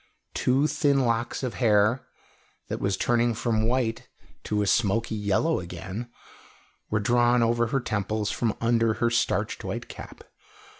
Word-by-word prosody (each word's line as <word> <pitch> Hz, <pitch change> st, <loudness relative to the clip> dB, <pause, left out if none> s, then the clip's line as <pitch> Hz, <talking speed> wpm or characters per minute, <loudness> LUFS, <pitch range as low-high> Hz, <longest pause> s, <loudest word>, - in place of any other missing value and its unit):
Two 135 Hz, +3 st, +2 dB
thin 140 Hz, -2 st, +2 dB
locks 115 Hz, +2 st, -1 dB
of 125 Hz, -, -2 dB
hair, 110 Hz, +1 st, +2 dB, 0.6 s
that -, -, -3 dB
was 100 Hz, -1 st, 0 dB
turning 120 Hz, +1 st, +1 dB
from 110 Hz, -1 st, 0 dB
white 120 Hz, -2 st, -1 dB, 0.4 s
to 105 Hz, -1 st, 0 dB
a -, -, -1 dB
smoky 115 Hz, +2 st, +1 dB
yellow 105 Hz, +10 st, +1 dB
again, 95 Hz, +6 st, -7 dB, 0.8 s
were 105 Hz, -, +1 dB
drawn 120 Hz, +2 st, +3 dB
over 120 Hz, 0 st, +2 dB
her 135 Hz, +4 st, 0 dB
temples 105 Hz, -2 st, -2 dB
from 115 Hz, -3 st, -1 dB
under 115 Hz, -1 st, +2 dB
her 120 Hz, -1 st, 0 dB
starched 120 Hz, 0 st, 0 dB
white -, -, -5 dB
cap. -, -, -10 dB
115 Hz, 145 wpm, -26 LUFS, 105-120 Hz, 0.8 s, drawn